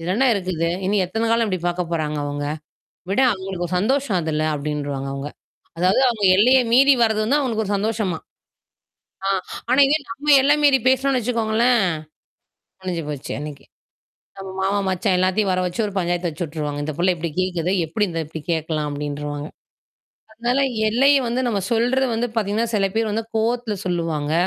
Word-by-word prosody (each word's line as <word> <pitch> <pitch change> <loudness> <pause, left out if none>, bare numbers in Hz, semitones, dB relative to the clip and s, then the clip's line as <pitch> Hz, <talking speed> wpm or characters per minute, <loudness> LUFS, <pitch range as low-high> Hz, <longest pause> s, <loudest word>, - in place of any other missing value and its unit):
இது 165 - -5
என்ன 265 +4 +3
இருக்குது? 180 -4 -1 0.2
இனி 205 +2 +1
எத்தனை 225 +5 -2
காலம் 230 0 +2
இப்படி 185 -3 -2
பார்க்கப் 175 -1 -3
போறாங்க 155 -2 -1
அவங்க? 145 0 -3 0.7
விட 200 - +1
அவங்களுக்கு 190 -2 -4
ஒரு 180 - -3
சந்தோஷம் 260 -2 +1
அதுல" 155 -1 -1
அப்படின்றுவாங்க 145 -2 -3
அவங்க. 140 +1 -5 0.5
அதாவது 185 +8 +3
அவங்க 220 -4 -3
எல்லையை 255 +5 +6
மீறி 275 +3 +7
வர்றது 220 -1 +2
வந்து 275 +7 +2
அவங்களுக்கு 230 -6 -1
ஒரு 205 - -3
சந்தோஷமாம். 205 -5 -2 1.1
ஆ - - +1 0.4
ஆனா, 265 +3 +4
இங்க 290 - +3
நாம 290 +6 0
எல்லை 290 +2 +4
மீறி 280 -2 +5
பேசினோம்னு 265 0 +2
வச்சுக்கோங்களேன், 230 -1 +2 1.0
முடிஞ்சு 180 -3 -3
போச்சு 145 -3 -6
அன்னைக்கு. 145 -1 -8 0.7
நம்ம 195 0 -7
மாமா, 200 +1 +1
மச்சான் 185 +1 +1
எல்லாத்தையும் 190 +2 +1
வரவச்சு 180 +1 -2
ஒரு 205 - -5
பஞ்சாயத்து 175 -1 0
வச்சுட்டுருவாங்க. 150 -2 -4
"இந்தப் 150 -1 -5
புள்ள 185 +2 +3
இப்படி 165 0 -4
கேக்குதே, 180 -1 0
எப்படி 205 +6 0
இந்த 165 -1 -3
இப்படி 160 +1 -8
கேட்கலாம்?" 155 -2 -1
அப்படின்றுவாங்க. 145 0 -4 0.8
அதனால 240 +4 -1 0.3
எல்லைய 275 +5 +4
வந்து 245 +2 0
நாம 205 -4 0
சொல்றது 245 +3 +2
வந்து 240 +2 -1
பார்த்தீங்கன்னா, 220 +2 0
சில 195 -1 +2
பேர் 225 -2 0
வந்து 220 +1 -2
கோவத்துல 230 -1 0
சொல்லுவாங்க. 165 -4 -1
190 Hz, 160 wpm, -21 LUFS, 165-230 Hz, 1.1 s, மீறி